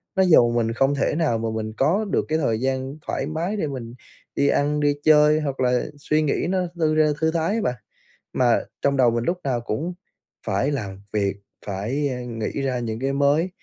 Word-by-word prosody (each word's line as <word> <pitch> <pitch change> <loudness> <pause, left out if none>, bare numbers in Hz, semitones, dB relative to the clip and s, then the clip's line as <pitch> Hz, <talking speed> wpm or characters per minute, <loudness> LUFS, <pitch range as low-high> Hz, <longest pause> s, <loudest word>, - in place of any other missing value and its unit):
nó 190 - +4
dồn 120 -10 +5
mình 115 -1 +1
không 135 +4 +2
thể 140 +1 0
nào 155 -9 +1
mà 115 0 -2
mình 110 0 -4
có 180 +11 +2
được - - +1
cái 155 - +2
thời 115 -8 0
gian 130 +1 -2
thoải - - -2
mái 170 +7 -2
để 160 - -1
mình 120 -4 -6 0.4
đi 140 - +2
ăn, 145 +1 +1
đi 145 -1 +2
chơi, 150 0 +5
hoặc 140 -3 -3
là 125 -1 +2
suy 155 +2 0
nghĩ 150 +1 0
nó 190 0 +1 0.2
thư 155 -2 +1
ra 155 0 +4
thư 160 0 +2
thái 170 +5 0
á 225 - 0
bạn. 125 - -1 0.6
Mà 120 -2 +3 0.2
trong 140 0 +1
đầu 125 -3 +5
mình 115 0 -1
lúc 180 +1 -1
nào 125 -4 -1
cũng 155 +11 -3 0.5
phải 105 +8 +1
làm 100 -8 -4
việc, 100 -2 0 0.3
phải, 110 +9 -2
a, 125 -1 -4
nghĩ 115 +3 -4
ra 130 -2 -1
những 115 -1 -4
cái 135 +1 -1
mới. 145 +5 +2
135 Hz, 215 wpm, -23 LUFS, 120-155 Hz, 0.6 s, dồn